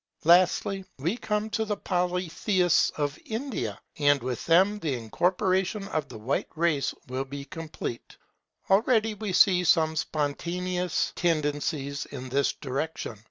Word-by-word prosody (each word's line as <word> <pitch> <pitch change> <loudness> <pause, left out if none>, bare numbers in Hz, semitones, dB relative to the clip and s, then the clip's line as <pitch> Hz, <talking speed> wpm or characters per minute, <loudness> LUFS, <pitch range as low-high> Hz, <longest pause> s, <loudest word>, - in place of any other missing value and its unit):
Lastly, 185 +3 +4
we 165 - -1
come 215 -2 -2
to 220 +2 0
the 210 -1 -2
Polytheists 180 0 +1
of 145 0 -2
India; 220 - -4 0.2
and 145 -1 +4
with 125 -2 -3
them 190 +5 +4
the 150 -8 -1
incorporation 185 - 0
of 155 -7 -2
the - - -8
White 115 +6 -2
race 160 -4 +1 0.2
will 130 +2 -2
be 140 +1 -7
complete. 155 -5 -7 0.5
Already 220 +2 +3
we 210 -1 -4
see 180 -1 +5
some 160 -2 +3
spontaneous 170 +4 -1
tendencies 145 -3 -1
in 130 +1 -7
this 140 +2 +2
direction. 135 -5 -4
170 Hz, 130 wpm, -27 LUFS, 140-190 Hz, 0.5 s, see